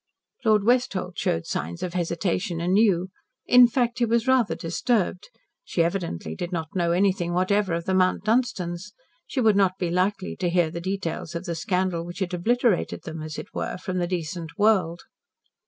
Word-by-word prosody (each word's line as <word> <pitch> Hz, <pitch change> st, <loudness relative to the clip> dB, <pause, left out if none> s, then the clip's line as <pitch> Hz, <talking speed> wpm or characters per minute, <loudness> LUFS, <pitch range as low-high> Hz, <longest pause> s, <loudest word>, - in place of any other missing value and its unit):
Lord 215 Hz, -3 st, +4 dB
Westholt 200 Hz, -6 st, +1 dB
showed 80 Hz, -, 0 dB
signs 85 Hz, +3 st, -4 dB
of 180 Hz, -, -3 dB
hesitation 175 Hz, +1 st, -1 dB
anew. 185 Hz, 0 st, +2 dB, 0.4 s
In 250 Hz, 0 st, +8 dB
fact, 240 Hz, 0 st, 0 dB
he 240 Hz, -, +3 dB
was 230 Hz, +1 st, +1 dB
rather 260 Hz, -5 st, +3 dB
disturbed. 185 Hz, +2 st, -1 dB, 0.3 s
She 170 Hz, -, 0 dB
evidently 170 Hz, -, -3 dB
did 175 Hz, -, -5 dB
not 165 Hz, -1 st, -4 dB
know 170 Hz, -2 st, +1 dB
anything 180 Hz, -1 st, +1 dB
whatever 185 Hz, 0 st, +1 dB
of 170 Hz, 0 st, -4 dB
the 190 Hz, -, 0 dB
Mount 185 Hz, 0 st, +2 dB
Dunstans. 210 Hz, -5 st, -1 dB, 0.3 s
She 270 Hz, -, -3 dB
would 220 Hz, -3 st, +4 dB
not 190 Hz, -2 st, +3 dB
be 175 Hz, -3 st, -2 dB
likely 185 Hz, +2 st, 0 dB
to 180 Hz, -, 0 dB
hear 170 Hz, -2 st, +2 dB
the 170 Hz, -, -5 dB
details 175 Hz, -3 st, -4 dB
of 170 Hz, +2 st, -4 dB
the 170 Hz, -, -2 dB
scandal 180 Hz, +1 st, -1 dB
which 175 Hz, +1 st, -8 dB
had 190 Hz, -2 st, -3 dB
obliterated 225 Hz, +3 st, +1 dB
them, 160 Hz, -1 st, -6 dB
as 155 Hz, -1 st, -6 dB
it -, -, -8 dB
were, -, -, -3 dB
from 185 Hz, 0 st, -3 dB
the 175 Hz, -, 0 dB
decent 170 Hz, -1 st, -4 dB
world. 195 Hz, -5 st, +2 dB
185 Hz, 180 wpm, -25 LUFS, 170-205 Hz, 0.4 s, In